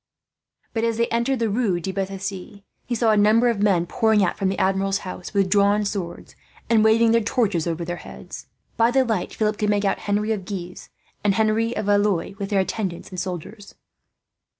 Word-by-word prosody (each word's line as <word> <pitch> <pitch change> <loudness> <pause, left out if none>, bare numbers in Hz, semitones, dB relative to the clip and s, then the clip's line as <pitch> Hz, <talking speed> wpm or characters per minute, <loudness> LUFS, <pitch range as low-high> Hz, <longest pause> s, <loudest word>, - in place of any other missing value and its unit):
But 225 - -1
as 230 -1 0
they 235 - +2
entered 235 +3 0
the 230 -1 0
Rue 205 -5 +1
de 180 +3 -4
Bethisy, 195 +1 -5 0.2
he 240 - -1
saw 230 -1 +3
a - - +4
number 215 +4 +4
of 220 -4 -1
men 190 -5 +3
pouring 220 +2 +2
out 180 - 0
from 195 -2 0
the 195 - -2
Admiral's 195 +1 0
house, 180 -1 -7
with 200 -2 +2
drawn 205 +1 +3
swords 190 -4 -5 0.4
and 220 -2 +5
waving 225 +1 +4
their 230 0 +4
torches 210 - 0
over 170 0 -2
their 175 +1 -4
heads. - - -10 0.3
By 230 0 +4
the 260 +1 +3
light, 220 -6 -1
Philip 215 -1 0
could 210 - +1
make 205 0 +1
out 195 - +1
Henri 210 +2 -1
of 210 -4 -2
Guise 180 -2 -7 0.3
and 200 -2 +2
Henry 220 +2 +1
of 215 - -2
Valois, 205 -3 +1
with 195 -1 -3
their 200 -2 +2
attendants 190 -3 -4
and 185 - -5
soldiers. 190 +3 -7
205 Hz, 200 wpm, -23 LUFS, 190-220 Hz, 0.4 s, and